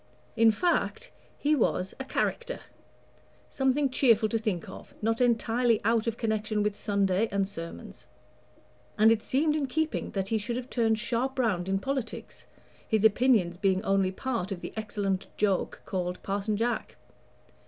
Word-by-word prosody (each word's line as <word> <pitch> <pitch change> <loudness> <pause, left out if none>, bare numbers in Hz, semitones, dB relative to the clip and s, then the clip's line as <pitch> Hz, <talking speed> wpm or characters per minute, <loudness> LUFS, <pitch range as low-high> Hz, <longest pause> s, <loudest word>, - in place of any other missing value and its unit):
In 225 0 +6
fact, 340 - 0 0.3
he 295 +1 +1
was 190 -7 0
"a 265 - -4
charicter 475 - -2 0.5
" - - -32
something 265 +2 +3
cheerful 230 -5 +4
to 225 - 0
think 210 -7 -2
of, - - -11
not 225 +2 0
entirely 235 -1 +2
out 230 0 +2
of 230 0 -1
connection 215 -2 -1
with 210 -1 0
Sunday 200 +1 +1
and 195 -1 +1
sermons. 170 -4 -9 0.9
And 220 +1 +6
it 225 -1 +2
seemed 300 +6 +1
in 290 -3 0
keeping 315 +4 -1
that 195 -1 -2
he 225 - +1
should 235 +3 -3
have 250 0 -6
turned 225 -2 +2
sharp 235 +4 -1
round 195 -8 0
in 195 - +2
politics, 265 +2 -5 0.4
his 220 -1 +2
opinions 215 -6 +3
being 190 0 +1
only 195 -2 +2
part 225 -2 -3
of 180 -3 -4
the - - -7
excellent 205 -3 -2
joke 200 -3 0
called 180 -1 -3
Parson 200 +1 -1
Jack. 235 +2 -2
220 Hz, 160 wpm, -28 LUFS, 195-245 Hz, 0.9 s, In